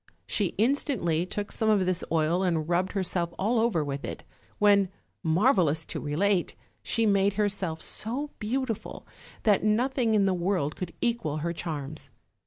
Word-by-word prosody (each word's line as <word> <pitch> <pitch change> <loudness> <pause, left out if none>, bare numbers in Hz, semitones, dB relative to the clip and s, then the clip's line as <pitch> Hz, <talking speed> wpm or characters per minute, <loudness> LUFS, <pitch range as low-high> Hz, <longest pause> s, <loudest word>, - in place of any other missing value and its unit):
She 200 -4 0
instantly 215 - +1
took 205 +2 -4
some 220 - 0
of 205 -3 +3
this 185 -1 0
oil 165 +2 +2
and 165 -4 0
rubbed 175 +2 0
herself 175 -3 -1
all 225 +5 +1
over 220 -9 +2
with 140 -1 -4
it, - - -6 0.3
when, 200 -2 +4 0.3
marvelous 165 - +3
to - - -4
relate! 175 +5 0 0.3
she 230 -1 +1
made 200 -1 +3
herself 195 -6 -1
so 270 +7 -3
beautiful 230 0 -3 0.4
that 205 -3 +3
nothing 230 +1 +2
in 200 -2 +4
the 190 - +2
world 175 -4 0
could 180 -2 -6
equal 230 -11 0
her 170 - -1
charms. 150 -4 -5
195 Hz, 155 wpm, -28 LUFS, 165-215 Hz, 0.4 s, when